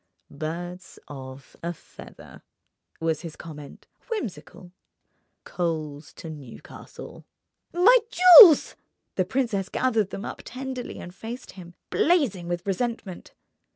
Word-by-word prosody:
"Birds 175 +4 -7
of 130 -1 -11
a 170 +1 -3
feather," - - -15 0.6
was 160 -2 -1
his 165 -3 -8
comment, 150 -3 -11 0.2
whimsical; 225 - -6 0.7
"coals 155 -4 -4
to - - -10
Newcastle!" 145 -7 -11 0.5
"My 425 +9 +6
jewels!" 365 -3 +9 0.4
The 185 - 0
princess 215 -4 -1
gathered 225 -6 0
them 200 - -7
up - - -7
tenderly 255 -1 -6
and 175 - -9
faced 235 +6 -8
him, 175 -2 -13 0.2
blazing 270 - +1
with 175 0 -4
resentment. 205 -2 -4
185 Hz, 110 wpm, -25 LUFS, 165-250 Hz, 0.7 s, jewels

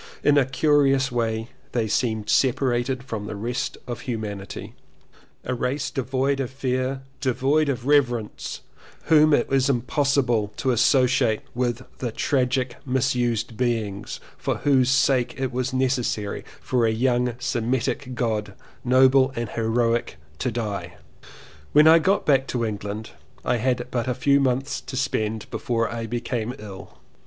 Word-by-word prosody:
In 145 - +5
a 140 -2 +4
curious 135 -1 +3
way 115 -1 -1 0.2
they 115 -3 0
seemed 110 -1 0
separated 125 0 +1
from 110 -5 -5
the 105 - -5
rest 120 +5 -3
of 120 -2 -5
humanity: 110 -6 -5 0.7
a 125 - -2
race 130 +2 -2
devoid 135 0 0
of 130 -3 -2
fear, 130 0 -2 0.2
devoid 140 +3 +1
of 125 -3 -2
reverence, 125 -6 0 0.4
whom 155 -1 +5
it 135 -5 +3
was 135 0 +2
impossible 125 -4 +1
to 130 - +1
associate 125 -1 +3
with 120 0 -1 0.2
the 120 -3 -2
tragic 125 0 0
misused 125 -4 0
beings 110 -4 -2 0.2
for - - -1
whose 135 -3 +3
sake 130 -1 +2
it 130 -1 -1
was 130 +1 -2
necessary 125 -5 -1 0.2
for 120 -3 +1
a - - +2
young 125 +1 +1
Semitic 125 +1 -2
God, 105 -4 -2 0.3
noble 130 +1 +5
and 115 -1 -3
heroic, 115 - 0 0.2
to 130 - 0
die. 110 -3 -4 0.8
When 150 +1 +7
I 165 +1 +8
got 195 +5 +1
back 135 -2 +3
to 120 -2 -1
England 105 0 -5 0.3
I 125 - +2
had 125 +1 0
but 120 0 -1
a 125 - 0
few 140 +2 +3
months 135 +1 0
to 130 - -7
spend 110 -4 -1
before 115 -1 -1
I 115 -1 -4
became 120 0 -3
ill. 100 -2 -10
125 Hz, 145 wpm, -24 LUFS, 115-135 Hz, 0.8 s, I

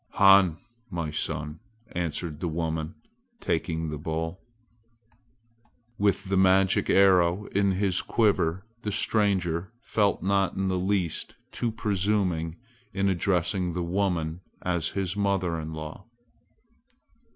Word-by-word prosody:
"Han, 95 -4 +6 0.3
my 85 -5 -3
son!" 75 0 -3 0.3
answered 85 -2 -3
the 90 - -2
woman, 80 -1 -3 0.4
taking 80 -1 -1
the 75 - -5
bowl. 80 +3 -3 1.6
With 100 -1 +2
the 95 0 +1
magic 95 0 +4
arrow 95 0 +4
in 100 -1 +2
his 95 -1 +1
quiver 100 -4 +1 0.2
the 105 - -3
stranger 95 -4 +1
felt 105 -8 +1
not 95 0 +1
in 95 0 0
the 95 -1 0
least 95 -3 -1 0.2
too 120 - -1
presuming 95 -6 0 0.4
in 100 0 +1
addressing 90 -1 0
the 90 +1 -2
woman 85 -2 -1 0.2
as 85 -3 0
his 95 -1 -1
mother 95 -5 0
in 80 0 -6
law. 80 +4 -7
90 Hz, 120 wpm, -27 LUFS, 80-100 Hz, 1.6 s, Han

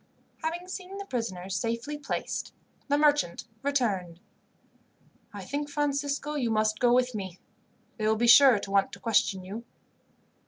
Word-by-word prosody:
Having 340 +3 -3
seen 375 +1 -7
the 400 - -6
prisoners 195 - -4
safely 230 +8 -2
placed, 290 -2 -4 0.3
the 285 0 +2
merchant 295 - +2 0.2
returned. 205 -12 -1 1.1
"I 200 -3 -8
think, 290 +4 -3
Francisco, 285 0 -1
you 260 -6 -1
must 215 -1 +1
go 245 -1 +4
with 250 0 +3
me. 190 -4 -5 0.6
They 215 -1 -1
will 220 - +3
be 235 +2 +1
sure 250 0 +8
to 200 0 -6
want 195 -1 +3
to - - -9
question 215 -4 +1
you." 205 +5 -7
240 Hz, 150 wpm, -28 LUFS, 205-285 Hz, 1.1 s, sure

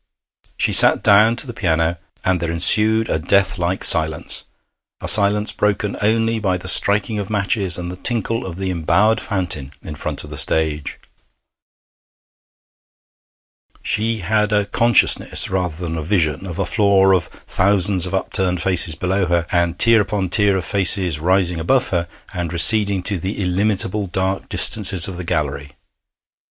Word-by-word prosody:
She - - -1
sat - - +6
down 105 +3 +4
to 135 - -3
the 120 - -9
piano, 80 -4 -2 0.3
and 95 -1 0
there 85 -1 -4
ensued 110 +6 +3
a 80 - -2
death 100 +3 0
like 90 +2 -3
silence 80 -2 +2 0.5
a - - -7
silence 105 0 +5
broken 105 0 -2
only 115 +2 0
by 95 -4 -2
the 95 +1 -10
striking 105 +3 +2
of 100 - -6
matches 100 -3 0
and 90 0 -6
the - - -8
tinkle 115 +2 -2
of 90 -3 -8
the 95 0 -4
embowered 100 +6 0
fountain 85 - -4
in 80 - -8
front 75 - -6
of - - -13
the - - -4
stage. 75 -2 -3 2.9
She 110 0 -1
had 105 +3 -1
a 105 -1 0
consciousness, 115 +3 +1
rather 90 -2 -4
than 80 -1 -4
a - - -5
vision, 85 +1 -2
of 85 -2 -7
a 100 - -2
floor 100 -3 +2
of 90 -4 0
thousands 95 -1 0
of 95 - -4
upturned 95 -1 -2
faces 85 -4 +1
below 95 +2 -2
her, 85 -1 -1
and 85 -1 -1
tier 115 -2 +4
upon 100 -2 -3
tier 100 -1 +2
of 90 - -5
faces 90 -4 +1
rising 90 0 0
above 125 +11 0
her 85 -2 -2 0.3
and 90 -2 -5
receding 100 +2 +3
to 100 -1 -2
the 95 +6 -6
illimitable 100 +1 -1
dark 95 +2 -3
distances 95 -5 +4
of 95 -3 -8
the 90 - -7
gallery. 75 -5 -4
95 Hz, 160 wpm, -18 LUFS, 85-105 Hz, 2.9 s, sat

